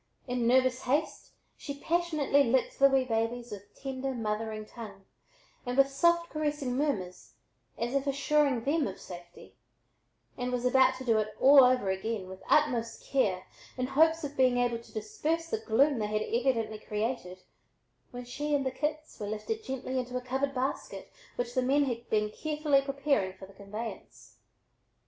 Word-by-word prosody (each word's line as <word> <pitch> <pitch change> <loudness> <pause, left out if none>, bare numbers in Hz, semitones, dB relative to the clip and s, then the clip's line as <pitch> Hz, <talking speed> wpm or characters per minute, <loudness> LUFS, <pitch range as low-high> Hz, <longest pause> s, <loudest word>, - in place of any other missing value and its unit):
In 245 -2 0
nervous 255 +1 +3
haste 290 +5 -1 0.3
she 280 -1 -7
passionately 315 -4 +2
licked 255 0 0
the 275 0 +7
wee 270 -1 +3
babies 235 +1 -2
with 205 0 -10
tender, 270 -1 -3
mothering 215 -1 -3
tongue, 210 -4 -10 0.6
and 250 0 -3
with 275 0 +5
soft 340 +4 +2
caressing 295 -4 -2
murmurs 215 -11 -2 0.4
as 240 +2 -2
if 275 0 0
assuring 280 -2 +2
them 290 +2 +1
of 190 - -7
safety 175 -1 -11 0.9
and 250 0 -2
was 250 0 -2
about 260 +1 +5
to 260 - -8
do 225 -3 +3
it 215 0 -3
all 275 0 +8
over 250 -6 +3
again 190 0 -3
with 190 0 -10
utmost 245 -7 +2
care 195 -9 0 0.3
in 255 - 0
hopes 320 +5 +3
of 290 0 -5
being 255 -1 +3
able 240 -1 +1
to 230 - -17
disperse 305 +10 -2
the 450 - 0
gloom 275 - +2
they 210 - -1
had 215 0 -1
evidently 230 -3 0
created 210 -4 -4 0.7
when 245 0 -8
she 290 +4 -2
and 275 -1 0
the 260 - 0
kits 305 +2 -4
were 205 - -4
lifted 215 - -4
gently 260 -2 -3
into 250 0 -3
a - - -3
covered 265 +2 -2
basket 260 +2 -3 0.2
which 245 0 -3
the 255 - +2
men 275 +3 +3
had 240 -3 -4
been 210 -1 +1
carefully 300 0 +1
preparing 275 -8 0
for 190 - -10
the 195 - -16
conveyance. 210 +4 -8
255 Hz, 170 wpm, -30 LUFS, 220-280 Hz, 0.9 s, all